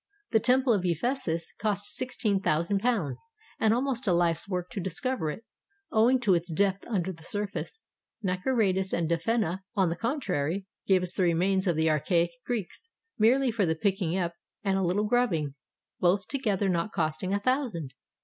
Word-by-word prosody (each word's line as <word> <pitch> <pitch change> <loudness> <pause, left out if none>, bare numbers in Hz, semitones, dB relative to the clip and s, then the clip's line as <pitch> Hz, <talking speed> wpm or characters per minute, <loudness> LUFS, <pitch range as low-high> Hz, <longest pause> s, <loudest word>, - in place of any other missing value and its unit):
The 220 - +5
Temple 255 +1 +3
of 200 -4 0
Ephesus 170 - -1
cost 205 -1 -2
sixteen 240 -6 0
thousand 170 +4 +1
pounds, 215 - -1 0.4
and 220 - +3
almost 250 0 0
a 180 - +4
Hfe's 170 +1 +1
work 180 -2 -3
to 225 - -4
discover 190 - -2
it, 220 +9 -6 0.5
owing 240 +4 +4
to 205 -6 +4
its 170 0 0
depth 195 +3 +1
imder 190 -5 -2
the 165 - -16
surface. 205 - -4 0.4
Naukratis 190 0 +1
and 170 -1 +1
Defenneh, 180 +2 0 0.2
on 190 -4 +3
the 165 - -1
con 240 - -1
trary, 180 - -1 0.2
gave 185 -2 +4
us 180 0 -3
the - - -1
remains 185 +3 +2
of 175 - +2
the 160 0 +2
archaic 170 +3 +2 0.2
Greeks, 240 - -4 0.3
merely 250 +4 +4
for 210 -5 +1
the 160 - +1
picking 190 -1 0
up 170 -2 -1 0.3
and 195 -2 +1
a 195 - +1
Uttle 190 +4 +1
grubbing, 185 - +1 0.5
both 185 +3 +2
together 210 -8 0
not 180 +2 0
costing 160 +2 -1
a 200 - +2
thousand. 210 - -1
195 Hz, 175 wpm, -28 LUFS, 170-225 Hz, 0.5 s, The